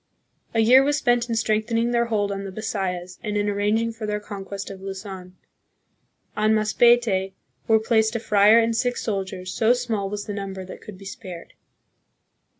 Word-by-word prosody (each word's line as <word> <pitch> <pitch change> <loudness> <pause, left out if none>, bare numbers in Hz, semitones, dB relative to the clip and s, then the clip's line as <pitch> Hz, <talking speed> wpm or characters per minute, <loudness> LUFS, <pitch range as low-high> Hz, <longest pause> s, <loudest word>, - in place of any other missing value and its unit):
A 225 - +4
year 250 +4 +7
was 290 +1 +1
spent 240 -3 +1
in 230 - 0
strengthening 225 +1 0
their 235 -1 +2
hold 210 -3 0
on 195 0 -4
the 195 - -6
Bisayas 185 -4 -4
and 210 -1 -2
in 205 0 0
arranging 210 +3 +1
for 225 -1 -6
their 210 0 -1
conquest 200 -1 -7
of 190 -1 -10
Luzon. 190 -1 -8 1.0
On 215 +1 +3
Masbate 215 -3 +3 0.3
were 220 - +5
placed 220 0 +1
a - - 0
friar 210 0 +5
and 230 0 +2
six 245 +1 -1
soldiers, 190 -3 -4
so 230 +1 +3
small 225 -5 -2
was 205 0 -5
the 210 - -5
number 195 -2 -5
that 185 - -10
could 205 -3 -10
be 195 - -13
spared. 195 -5 -9
210 Hz, 175 wpm, -23 LUFS, 195-230 Hz, 1.0 s, year